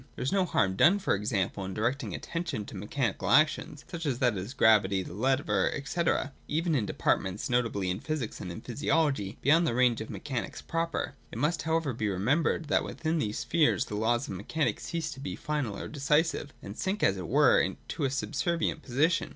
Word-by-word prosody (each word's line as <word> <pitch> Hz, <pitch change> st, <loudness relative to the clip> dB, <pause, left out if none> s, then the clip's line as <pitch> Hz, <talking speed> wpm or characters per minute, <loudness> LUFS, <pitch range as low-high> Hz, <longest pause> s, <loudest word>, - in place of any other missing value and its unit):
There -, -, -4 dB
is 130 Hz, -, 0 dB
no 195 Hz, -2 st, +2 dB
harm 95 Hz, -, +1 dB
done, 175 Hz, -, +6 dB
for 195 Hz, -, 0 dB
example, 100 Hz, -1 st, -1 dB
in 95 Hz, 0 st, -5 dB
directing 120 Hz, -, -1 dB
attention 165 Hz, -11 st, -4 dB
to -, -, -10 dB
mechanical 105 Hz, -1 st, -2 dB
actions, 150 Hz, +2 st, +2 dB
such 170 Hz, -3 st, -5 dB
as 130 Hz, -4 st, 0 dB
that 125 Hz, -4 st, +2 dB
of 100 Hz, +8 st, -6 dB
gravity, 100 Hz, -4 st, +4 dB
the -, -, -9 dB
lever, 110 Hz, -3 st, +1 dB
&c., 170 Hz, -, -2 dB, 0.5 s
even 165 Hz, +2 st, 0 dB
in 120 Hz, -8 st, +1 dB
de -, -, -3 dB
partments, 95 Hz, +5 st, 0 dB
notably 115 Hz, -6 st, +1 dB
in 90 Hz, -, -3 dB
physics 155 Hz, -8 st, -4 dB
and 90 Hz, -, -5 dB
in 85 Hz, -, -7 dB
physiology, 135 Hz, -5 st, 0 dB
beyond 160 Hz, +5 st, +5 dB
the 115 Hz, -, 0 dB
range 125 Hz, -2 st, +3 dB
of 110 Hz, -, -6 dB
mechanics 125 Hz, -9 st, -4 dB
proper. 165 Hz, -3 st, -2 dB, 0.2 s
It -, -, -7 dB
must 155 Hz, +6 st, +1 dB
however 160 Hz, -4 st, 0 dB
be 110 Hz, -2 st, -1 dB
remembered, 130 Hz, -, +1 dB
that 145 Hz, -, +2 dB
within 160 Hz, 0 st, -2 dB
these 105 Hz, -5 st, -2 dB
spheres 155 Hz, -4 st, +2 dB
the 105 Hz, -, -5 dB
laws 120 Hz, +5 st, +1 dB
of -, -, -5 dB
mechanism 140 Hz, -, -1 dB
cease 165 Hz, -2 st, -3 dB
to 135 Hz, -, -9 dB
be 140 Hz, -, -4 dB
final 145 Hz, -9 st, -2 dB
or -, -, -5 dB
decisive, 150 Hz, +1 st, +1 dB
and 100 Hz, -, -7 dB
sink, 195 Hz, -, -2 dB
as 95 Hz, -, +3 dB
it 90 Hz, -3 st, -5 dB
were, -, -, +4 dB
to -, -, -3 dB
a 135 Hz, -, +2 dB
subservient 160 Hz, +4 st, -1 dB
position. 155 Hz, +7 st, +1 dB
130 Hz, 200 wpm, -29 LUFS, 105-155 Hz, 0.5 s, done